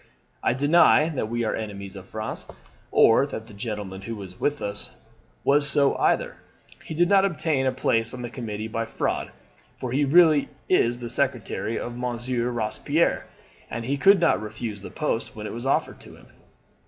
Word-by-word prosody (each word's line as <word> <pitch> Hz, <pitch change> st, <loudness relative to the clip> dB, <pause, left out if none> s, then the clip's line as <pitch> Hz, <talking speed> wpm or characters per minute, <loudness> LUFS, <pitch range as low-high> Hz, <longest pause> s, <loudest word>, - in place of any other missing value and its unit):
I -, -, +2 dB
deny 155 Hz, +3 st, +5 dB
that 130 Hz, -8 st, -3 dB
we 120 Hz, 0 st, -1 dB
are 110 Hz, -, 0 dB
enemies 100 Hz, -2 st, -6 dB
of 95 Hz, -1 st, -11 dB
France, 110 Hz, 0 st, -5 dB, 0.4 s
or 115 Hz, +5 st, +5 dB
that 110 Hz, -5 st, -6 dB
the 110 Hz, -, -13 dB
gentleman 100 Hz, -3 st, -5 dB
who 115 Hz, +3 st, -5 dB
was 95 Hz, -3 st, -10 dB
with 145 Hz, 0 st, 0 dB
us 100 Hz, 0 st, -6 dB, 0.5 s
was 145 Hz, +1 st, +4 dB
so 140 Hz, -1 st, +3 dB
either. -, -, +1 dB, 0.5 s
He 160 Hz, -, -7 dB
did 175 Hz, +2 st, +3 dB
not 195 Hz, 0 st, +5 dB
obtain 155 Hz, -7 st, 0 dB
a -, -, +3 dB
place 115 Hz, -3 st, 0 dB
on 125 Hz, -1 st, -7 dB
the 120 Hz, -, -5 dB
committee 110 Hz, -4 st, -5 dB
by 115 Hz, 0 st, -2 dB
fraud, -, -, -2 dB, 0.5 s
for 125 Hz, -, -5 dB
he 140 Hz, +3 st, +2 dB
was 140 Hz, +1 st, -1 dB
really 160 Hz, -5 st, +6 dB, 0.2 s
the 120 Hz, -8 st, +2 dB
secretary 120 Hz, -3 st, -1 dB
of 120 Hz, -, -5 dB
Monsieur 120 Hz, 0 st, -2 dB
Robespierre, 110 Hz, -3 st, 0 dB, 0.4 s
and 115 Hz, 0 st, -4 dB
he 140 Hz, +3 st, 0 dB
could 195 Hz, +7 st, +5 dB
not 165 Hz, -, +3 dB
refuse 110 Hz, -1 st, -6 dB
the -, -, -8 dB
post 150 Hz, -6 st, -2 dB
when 105 Hz, 0 st, -7 dB
it -, -, -5 dB
was 120 Hz, +3 st, -5 dB
offered 135 Hz, -, 0 dB
to -, -, -14 dB
him.' -, -, -18 dB
120 Hz, 185 wpm, -25 LUFS, 110-140 Hz, 0.5 s, really